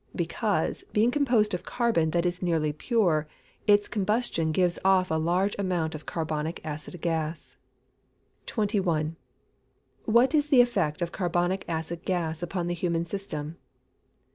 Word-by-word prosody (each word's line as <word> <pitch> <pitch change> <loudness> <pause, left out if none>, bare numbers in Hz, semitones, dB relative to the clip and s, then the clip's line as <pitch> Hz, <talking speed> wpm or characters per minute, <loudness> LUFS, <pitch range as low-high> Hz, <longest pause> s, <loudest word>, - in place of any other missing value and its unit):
_ - - -15
Because, - - -1
being 220 +3 +3
composed 245 -7 +2
of 180 - -2
carbon 230 -10 +1
that 170 +2 0
is 175 0 -1
nearly 160 -4 +1
pure, 165 - +1 0.4
its 205 0 +5
combustion 210 -6 0
gives 175 +1 +1
off 190 -2 +3
a 160 0 +1
large 180 +5 +1
amount 175 -5 0
of 155 -1 -9
carbonic 160 0 -3
acid 155 +3 -6
gas. 160 -1 -3 0.9
21. 185 -8 0 0.9
_What 235 +6 +4
is 295 -1 +3
the 265 -4 +7
effect 185 -10 0
of 170 - -3
carbonic 175 +1 0
acid 165 +1 -3
gas 165 -3 -1
upon 175 0 -2
the 175 - -1
human 170 -1 -1
system? 165 -4 -5
175 Hz, 140 wpm, -27 LUFS, 160-205 Hz, 0.9 s, the